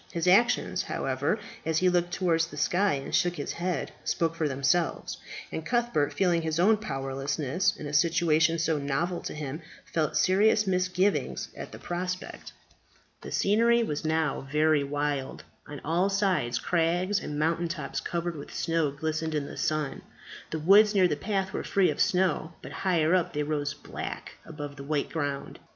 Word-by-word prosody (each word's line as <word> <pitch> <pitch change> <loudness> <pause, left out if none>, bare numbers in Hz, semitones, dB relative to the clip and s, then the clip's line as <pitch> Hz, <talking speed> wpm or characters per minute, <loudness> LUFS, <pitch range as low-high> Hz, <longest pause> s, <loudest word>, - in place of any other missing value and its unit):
His 170 0 -2
actions, 235 +7 +3
however, - - -1 0.3
as 160 -1 0
he 185 - +3
looked 175 -1 +2
towards 170 -3 +1
the - - -11
sky, 195 +3 +2
and 135 0 -6
shook 175 0 +2
his 145 - -4
head, 175 -3 -2
spoke 165 -1 0
for 165 -2 -1
themselves, 140 +5 0 0.3
and 160 - -4
Cuthbert, 235 -10 +1
feeling 175 -3 +2
his 160 0 -2
own 215 +5 +5
powerlessness 145 +2 -1
in 150 - -7
a 145 - -5
situation 165 0 +3
so 160 -2 +1
novel 160 +6 -1
to - - -6
him, 150 +1 -5 0.2
felt 155 -3 -1
serious 210 +3 +4
misgivings 185 +1 0
at - - -8
the - - -9
prospect. 180 +1 -5 0.7
The - - -8
scenery 235 +3 +3
was 150 -9 -3
now 155 -3 0
very 155 -1 +3
wild. 145 -1 -2 0.2
On 145 -1 -7
all 175 +5 +2
sides 190 -12 +1
crags 175 +6 +1
and 150 - -5
mountain 165 +3 +1
tops 155 -5 -4
covered 170 0 -3
with 145 - -9
snow 165 -3 0
glistened 155 +2 -3
in 145 -2 -1
the - - -8
sun. 155 -3 -1 0.5
The 160 - -3
woods 205 +6 +6
near 185 -2 +5
the 150 - 0
path 190 +4 -2
were - - -2
free 195 -2 +2
of - - -2
snow; 180 -4 +1
but - - -8
higher 170 -3 +1
up 185 -2 +1
they 150 0 0
rose 145 -1 -2
black 145 - -7 0.2
above 145 -2 -7
the 140 - -7
white 145 0 -1
ground. 145 -4 -3
165 Hz, 170 wpm, -28 LUFS, 150-185 Hz, 0.7 s, woods